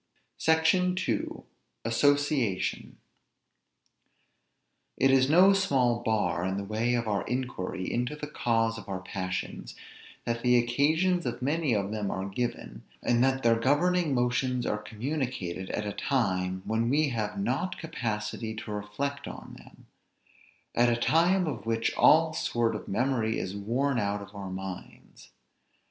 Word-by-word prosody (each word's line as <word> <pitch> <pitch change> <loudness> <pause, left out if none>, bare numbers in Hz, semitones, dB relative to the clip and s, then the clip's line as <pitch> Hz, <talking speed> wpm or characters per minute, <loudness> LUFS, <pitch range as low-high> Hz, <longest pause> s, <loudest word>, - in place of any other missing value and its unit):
SECTION 170 +3 +3
II. 110 -3 -2 0.4
ASSOCIATION. 140 -3 +1 2.0
It 135 - +4
is 135 0 +4
no 185 +5 +7
small 135 -12 +2
bar 110 -6 0
in 95 +1 -1
the 100 - -3
way 110 +4 0
of 120 -1 -1
our 100 -2 0
inquiry 125 -7 -3
into 125 +4 -1
the 150 - -6
cause 115 -5 0
of - - -12
our 95 -1 -3
passions, 95 0 -5 0.5
that 115 0 -2
the 125 0 +4
occasions 155 +9 +2
of 125 - -4
many 145 -2 +1
of 100 0 -1
them 105 -2 -2
are 95 0 -3
given, 120 +5 -4 0.2
and 120 0 +3
that 135 0 +1
their 115 -1 +4
governing 155 +4 +2
motions 125 0 0
are 105 - -1
communicated 110 - -4
at 105 - -2
a 105 - -3
time 95 -6 -1
when 115 +1 0
we 150 +2 +2
have 115 - -3
not 185 -2 -1
capacity 110 -7 -4
to 110 0 -7
reflect 135 +8 -4
on - - -9
them; - - -17 0.9
at 120 +1 +4
a 120 - +2
time 175 +8 +3
of 145 -7 -5
which 115 0 0
all 160 +1 +5
sort 115 -5 0
of - - -7
memory 115 0 0
is 95 +1 -4
worn 120 +6 0
out 100 -1 -1
of 100 0 -14
our 100 -2 -6
minds. 95 0 -8
120 Hz, 145 wpm, -28 LUFS, 105-140 Hz, 2.0 s, no